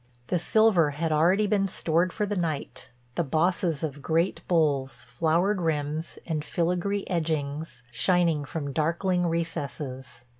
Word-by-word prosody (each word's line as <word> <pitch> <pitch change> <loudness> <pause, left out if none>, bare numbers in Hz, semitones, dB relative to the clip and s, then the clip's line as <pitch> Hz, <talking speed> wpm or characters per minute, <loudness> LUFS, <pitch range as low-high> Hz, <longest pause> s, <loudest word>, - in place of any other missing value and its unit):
The 180 - +1
silver 195 -4 +4
had 155 +3 -2
already 175 +7 +3
been 200 -1 +2
stored 175 0 +1
for 210 - -1
the 205 0 -2
night, 155 -6 -3 0.2
the 170 - 0
bosses 165 +1 +1
of 145 -2 -4
great 165 +5 0
bowls, 145 -6 +1
flowered 175 +5 +1
rims, 155 0 -2
and 155 -3 -2
filagree 180 +5 -1
edgings 155 -3 -2
shining 165 +4 +2
from 145 -1 -5
darkling 175 +3 +1
recesses. 140 -6 -4
165 Hz, 135 wpm, -27 LUFS, 150-180 Hz, 0.2 s, silver